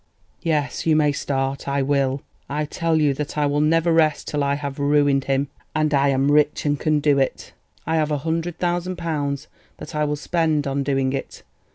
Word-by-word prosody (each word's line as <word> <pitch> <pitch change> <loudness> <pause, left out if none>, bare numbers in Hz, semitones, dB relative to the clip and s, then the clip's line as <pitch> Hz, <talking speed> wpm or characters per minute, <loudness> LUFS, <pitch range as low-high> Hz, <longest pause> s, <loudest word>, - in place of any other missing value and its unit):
"Yes, 150 -4 -1
you 160 - +4
may 150 -1 +3
start—I 140 0 -1
will. 135 -1 0 0.3
I 150 +2 -1
tell 165 +1 0
you 150 -2 +3
that 150 +2 -5
I 150 - +2
will 145 +1 +1
never 165 +2 +3
rest 155 -2 +2
till 145 -1 -1
I 140 0 +1
have 140 -1 -5
ruined 145 -1 +2
him, 135 +1 0 0.3
and 155 -1 +1
I 140 0 +3
am 135 +1 +2
rich 150 0 +2
and 145 -1 +1
can 155 -1 +2
do 145 -1 +3
it. 135 - -2 0.3
I 160 +1 0
have 155 -1 +1
a 150 - 0
hundred 165 +3 -2
thousand 175 +1 -1
pounds, 150 -4 -3 0.3
that - - -9
I 150 0 +1
will 150 0 -1
spend 160 -1 0
on 140 0 -1
doing 135 -1 0
it. 135 - -6
145 Hz, 200 wpm, -22 LUFS, 140-155 Hz, 0.3 s, you